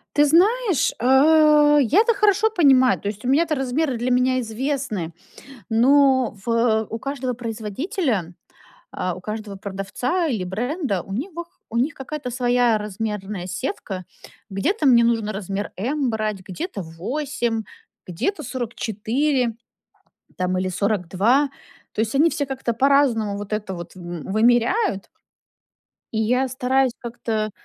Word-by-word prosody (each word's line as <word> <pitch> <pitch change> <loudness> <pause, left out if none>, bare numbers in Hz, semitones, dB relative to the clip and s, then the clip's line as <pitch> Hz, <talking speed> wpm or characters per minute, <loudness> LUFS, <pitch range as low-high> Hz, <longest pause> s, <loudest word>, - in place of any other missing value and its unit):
Ты 295 - +5
знаешь, 380 - +3
э, 295 +3 +5
я 345 - +4
то 465 0 +3
хорошо 420 +1 +3
понимаю. 270 -10 +4
То 200 - -6
есть 210 +2 -5
у - - -1
меня 300 +6 +4
то 310 -1 -1
размеры 270 +1 -1
для 245 +2 -1
меня 255 +1 +2
известны. 225 - -3 0.6
Но 260 +1 +4
в 230 -2 +2
у 225 - -4
каждого 260 -1 -3
производителя, 225 - -3 0.6
а, 180 -1 -3
у 185 - -10
каждого 215 0 -6
продавца 200 - -2
или 225 -10 -1
бренда, 230 - -2
у 195 - -9
них 295 - -3 0.4
у 230 - -3
них 270 +7 +1
какая-то 280 -1 -6
своя 245 -2 +2
размерная 210 -2 -4
сетка. 190 - -4 0.4
Где-то 295 - -1
мне 235 -3 +6
нужно 225 -2 +1
размер 200 0 -4
"M" 260 +6 -1
брать, 215 -2 -2
где-то 205 - -6
8, 225 - -3 0.4
где-то 265 - -3
44, 240 +1 -1 0.8
там 185 0 -1
или 185 0 -1
42. 200 +8 +1 0.4
То - - -3
есть 220 +2 -1
они 310 +5 +4
все 285 - -2
как-то 265 -3 -2
по-разному 255 -6 +2
вот 205 +1 -7
это 210 -2 -3
вот 170 0 -9
в 185 - -12 0.3
вымеряют. 240 - +2 1.0
И 220 - -2
я 250 +4 +2
стараюсь 260 0 +1
как-то, 225 -3 -3
240 Hz, 135 wpm, -22 LUFS, 210-280 Hz, 1.0 s, мне